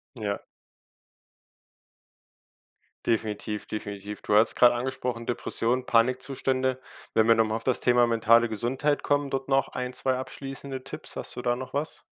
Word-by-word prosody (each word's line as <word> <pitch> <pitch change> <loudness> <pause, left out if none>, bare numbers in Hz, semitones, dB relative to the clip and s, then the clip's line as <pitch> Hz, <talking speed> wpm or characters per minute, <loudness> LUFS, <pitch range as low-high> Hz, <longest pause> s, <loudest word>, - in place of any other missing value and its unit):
Ja. 105 -4 -2 2.7
Definitiv, 105 -1 -1
definitiv. 105 -1 -6
Du 105 - -1
hattest 110 +2 +4
grade 120 -1 +6
angesprochen: 125 -1 -3
Depression, 125 +1 -1
Panikzustände. 130 +2 +1 0.3
Wenn 110 0 +4
wir 115 - +7
noch 110 0 +4
mal 110 - -2
auf 115 - -4
das 130 - +1
Thema 120 -1 +4
mentale 115 0 +4
Gesundheit 130 +7 0
kommen, 145 -1 +1
dort 135 0 -2
noch 135 0 +2
ein, 125 0 -4
2 130 0 0
abschließende 135 0 -6
Tipps. - - -9
Hast - - -6
du - - -4
da 120 0 +1
noch 130 +1 -7
was? 145 +3 -3
125 Hz, 150 wpm, -27 LUFS, 115-130 Hz, 2.7 s, wir